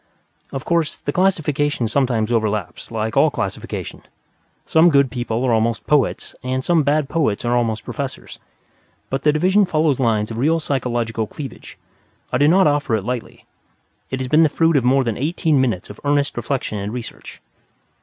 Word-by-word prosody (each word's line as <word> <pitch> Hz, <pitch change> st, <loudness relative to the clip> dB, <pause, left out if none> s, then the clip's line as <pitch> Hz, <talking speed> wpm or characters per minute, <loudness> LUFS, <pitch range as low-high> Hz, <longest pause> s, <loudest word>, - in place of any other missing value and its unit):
Of 135 Hz, -, -5 dB
course, 170 Hz, -3 st, 0 dB
the 145 Hz, -, -4 dB
classification 150 Hz, -8 st, +1 dB
sometimes 120 Hz, -3 st, 0 dB
overlaps, 110 Hz, -5 st, -2 dB
like 110 Hz, -1 st, -3 dB
all -, -, +5 dB
classification. -, -, -5 dB, 0.6 s
Some 160 Hz, +2 st, +5 dB
good 140 Hz, -4 st, +3 dB
people 120 Hz, -1 st, -2 dB
are 125 Hz, -3 st, +2 dB
almost 115 Hz, +1 st, 0 dB
poets 150 Hz, -3 st, +1 dB
and 130 Hz, +1 st, -2 dB
some 170 Hz, +1 st, +3 dB
bad 145 Hz, 0 st, +1 dB
poets 140 Hz, -9 st, 0 dB
are 120 Hz, +1 st, +1 dB
almost 115 Hz, -3 st, -1 dB
professors. -, -, -6 dB, 0.7 s
But 135 Hz, 0 st, -1 dB
the 150 Hz, -, +4 dB
division 185 Hz, +7 st, +3 dB
follows 155 Hz, -6 st, +1 dB
lines 110 Hz, -3 st, +1 dB
of 115 Hz, -, -5 dB
real 160 Hz, +5 st, +2 dB
psychological 120 Hz, -6 st, -2 dB
cleavage. 135 Hz, 0 st, -9 dB, 0.6 s
I 125 Hz, -, +2 dB
do 145 Hz, -, +5 dB
not 185 Hz, +4 st, +5 dB
offer 145 Hz, -6 st, +2 dB
it 105 Hz, -, -2 dB
lightly. 125 Hz, -1 st, -5 dB, 0.6 s
It 130 Hz, -, -3 dB
has 130 Hz, -, -2 dB
been 155 Hz, +5 st, +4 dB
the 160 Hz, -, +5 dB
fruit 165 Hz, +2 st, +2 dB
of 135 Hz, -, +3 dB
more 130 Hz, +2 st, +3 dB
than 115 Hz, -3 st, -3 dB
eighteen 155 Hz, -1 st, +1 dB
minutes 110 Hz, -8 st, -1 dB
of 100 Hz, -, -13 dB
earnest 145 Hz, 0 st, +1 dB
reflection 120 Hz, -3 st, -3 dB
and 100 Hz, +1 st, -4 dB
research. 120 Hz, -1 st, -8 dB
130 Hz, 175 wpm, -20 LUFS, 115-150 Hz, 0.7 s, all